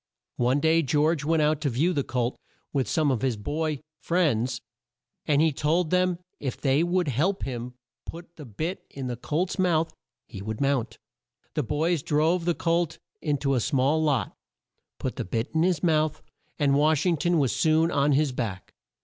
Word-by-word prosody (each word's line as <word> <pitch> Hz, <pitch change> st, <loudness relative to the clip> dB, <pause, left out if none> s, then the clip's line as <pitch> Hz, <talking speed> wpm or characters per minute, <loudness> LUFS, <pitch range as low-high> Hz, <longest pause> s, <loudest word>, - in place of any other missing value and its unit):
One 125 Hz, +3 st, +2 dB
day 160 Hz, +2 st, +3 dB
George 150 Hz, +1 st, +1 dB
went 160 Hz, 0 st, +2 dB
out 150 Hz, 0 st, +1 dB
to 145 Hz, -, +1 dB
view 150 Hz, +9 st, +1 dB
the 140 Hz, -4 st, 0 dB
colt 125 Hz, -1 st, -1 dB, 0.4 s
with 135 Hz, -3 st, 0 dB
some 155 Hz, -4 st, +2 dB
of 125 Hz, -, -1 dB
his 130 Hz, -4 st, 0 dB
boy 150 Hz, +6 st, -2 dB, 0.2 s
friends, 130 Hz, -9 st, +1 dB, 0.7 s
and 150 Hz, 0 st, +4 dB
he 160 Hz, -, +3 dB
told 155 Hz, +4 st, 0 dB
them 185 Hz, 0 st, +3 dB
that 175 Hz, +1 st, -12 dB, 0.2 s
if 135 Hz, -3 st, -3 dB
they 135 Hz, +1 st, +2 dB
would 175 Hz, 0 st, +1 dB
help 160 Hz, -, 0 dB
him 125 Hz, -1 st, -5 dB, 0.3 s
put 170 Hz, 0 st, -9 dB
the 150 Hz, -, -10 dB
bit 155 Hz, -, -4 dB
in 135 Hz, -1 st, -6 dB
the 125 Hz, -1 st, -3 dB
colt's 165 Hz, -, -2 dB
mouth 165 Hz, -3 st, +2 dB, 0.3 s
he 95 Hz, -, -9 dB
would 110 Hz, +1 st, -5 dB
mount. 135 Hz, -4 st, 0 dB, 0.6 s
The 150 Hz, -, 0 dB
boys 155 Hz, +5 st, 0 dB
drove 160 Hz, +5 st, +1 dB
the 175 Hz, -1 st, +1 dB
colt 170 Hz, -1 st, 0 dB, 0.2 s
in 150 Hz, -2 st, 0 dB
to 135 Hz, -, +3 dB
a 130 Hz, -, +2 dB
small 140 Hz, +4 st, +1 dB
lot, 145 Hz, -6 st, 0 dB, 0.6 s
put -, -, -4 dB
the -, -, -2 dB
bit 115 Hz, +7 st, -3 dB
in 160 Hz, -, +2 dB
his 180 Hz, 0 st, +1 dB
mouth, 155 Hz, -3 st, +1 dB, 0.3 s
and 140 Hz, -2 st, +2 dB
Wash 150 Hz, +2 st, +3 dB
ing 175 Hz, -3 st, +2 dB
ton 175 Hz, +3 st, +1 dB
was 135 Hz, -5 st, +1 dB
soon 160 Hz, +1 st, +3 dB
on 145 Hz, -1 st, +2 dB
his 145 Hz, 0 st, +2 dB
back. 110 Hz, -7 st, -5 dB
150 Hz, 190 wpm, -26 LUFS, 135-165 Hz, 0.7 s, and